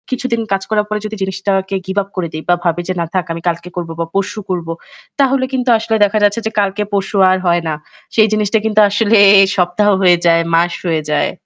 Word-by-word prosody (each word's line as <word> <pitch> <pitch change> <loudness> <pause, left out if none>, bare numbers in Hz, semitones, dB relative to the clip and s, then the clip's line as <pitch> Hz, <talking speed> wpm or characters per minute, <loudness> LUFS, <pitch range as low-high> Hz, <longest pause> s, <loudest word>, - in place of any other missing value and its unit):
কিছুদিন 255 -2 -2
কাজ 195 0 +1
করার 210 -1 +1
পরে 210 0 -2
যদি 215 +1 -5
জিনিসটাকে 190 0 -2
give 190 +2 -1
up 195 - -20
করে 180 -3 -2
দেই 155 0 -6
বা 175 - +5
ভাবি 175 -1 0
যে - - +1
না - - -1
থাক 185 -2 0
আমি 165 - -7
কালকে 170 +1 -2
করব 170 -2 -4
বা 165 - -1
পরশু 200 +3 -2
করব, 175 -3 -3 0.5
তাহলে 270 -1 +2
কিন্তু 255 -1 -1
আসলে 225 0 -2
দেখা 210 +1 -1
যাচ্ছে 205 +2 +2
যে 220 - -1
কালকে 200 +1 0
পরশু 200 +1 -2
আর 185 - +2
হয় 175 0 +2
না। 155 - -1 0.4
সেই 220 -1 +5
জিনিসটা 215 0 +1
কিন্তু 215 -1 +2
আসলে 215 +2 +2 0.4
সপ্তাহ 180 +3 +1
হয়ে 180 -2 +5
যায়, 165 0 +4
মাস 170 +1 +2
হয়ে 160 -2 0
যায়। 150 - +1
195 Hz, 220 wpm, -15 LUFS, 175-215 Hz, 0.5 s, বা